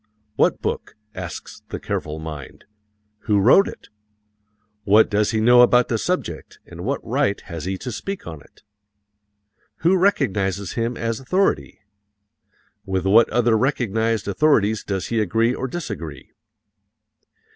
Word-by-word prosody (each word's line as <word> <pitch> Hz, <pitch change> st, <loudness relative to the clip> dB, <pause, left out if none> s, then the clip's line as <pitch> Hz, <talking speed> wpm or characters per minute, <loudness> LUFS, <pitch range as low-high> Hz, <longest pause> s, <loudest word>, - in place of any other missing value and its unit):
"What -, -, +1 dB
book?" -, -, -3 dB, 0.2 s
asks 90 Hz, -2 st, -8 dB
the -, -, -5 dB
careful 75 Hz, 0 st, -4 dB
mind. 75 Hz, -4 st, -9 dB, 0.6 s
"Who 105 Hz, -1 st, +3 dB
wrote 130 Hz, -, +6 dB
it? -, -, -10 dB, 0.9 s
What 105 Hz, +2 st, +4 dB
does 105 Hz, 0 st, +2 dB
he 110 Hz, -, 0 dB
know 120 Hz, +2 st, +6 dB
about 125 Hz, 0 st, +4 dB
the 115 Hz, -, 0 dB
subject 105 Hz, -, -3 dB
and 85 Hz, 0 st, -10 dB
what 140 Hz, +7 st, -3 dB
right 130 Hz, -3 st, 0 dB
has 85 Hz, -5 st, -7 dB
he 95 Hz, 0 st, -2 dB
to 125 Hz, -, -6 dB
speak 195 Hz, -, -6 dB
on 80 Hz, -4 st, -8 dB
it? -, -, -23 dB, 1.2 s
Who 180 Hz, +3 st, +5 dB
recognizes 100 Hz, -, 0 dB
him 115 Hz, +1 st, -2 dB
as 115 Hz, -1 st, -2 dB
authority? 185 Hz, -, 0 dB, 1.0 s
With 95 Hz, -1 st, -2 dB
what 110 Hz, +4 st, +5 dB
other 120 Hz, -1 st, +2 dB
recognized 115 Hz, -3 st, 0 dB
authorities 110 Hz, -3 st, +2 dB
does 95 Hz, -4 st, -3 dB
he 115 Hz, -, 0 dB
agree 115 Hz, +4 st, +1 dB
or 130 Hz, -, -3 dB
disagree?" 105 Hz, -, -7 dB
110 Hz, 135 wpm, -22 LUFS, 95-125 Hz, 1.2 s, wrote